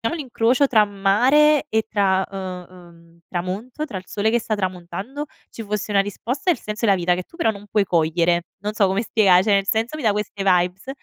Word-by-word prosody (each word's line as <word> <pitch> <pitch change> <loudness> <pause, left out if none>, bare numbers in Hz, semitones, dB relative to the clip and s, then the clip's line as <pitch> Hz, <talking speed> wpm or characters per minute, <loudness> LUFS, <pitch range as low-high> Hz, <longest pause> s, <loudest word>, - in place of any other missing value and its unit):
l'incrocio 255 -3 +1
tra 220 -5 +4
mare 255 +10 +3
e 220 0 0
tra, 190 -3 +1
uhm, 185 -2 -6
uhm 170 -2 -18
tramonto, 200 - -4
tra 210 -10 -6
il 185 - -9
sole 210 +1 0
che 240 - +2
sta 220 -1 -2
tramontando 190 +8 -5 0.2
ci 225 - -8
fosse 210 0 -3
una 200 -1 +4
risposta 240 - -4
al 300 - -2
senso 210 +2 -4
della 195 -2 +4
vita, 180 0 +1
che 180 - -4
tu 335 - -19
però 225 - +2
non 205 -1 -11
puoi 205 -1 +1
cogliere. 170 0 +1
Non 210 +1 -4
so 200 -2 +3
come 195 +4 0
spiega 195 -5 +4
cioè 210 0 +2
nel 195 0 +2
senso 225 +7 0
mi 300 - -7
dà 215 - +4
queste 205 -1 -4
vibes. 180 +3 +1
205 Hz, 210 wpm, -21 LUFS, 185-225 Hz, 0.2 s, tra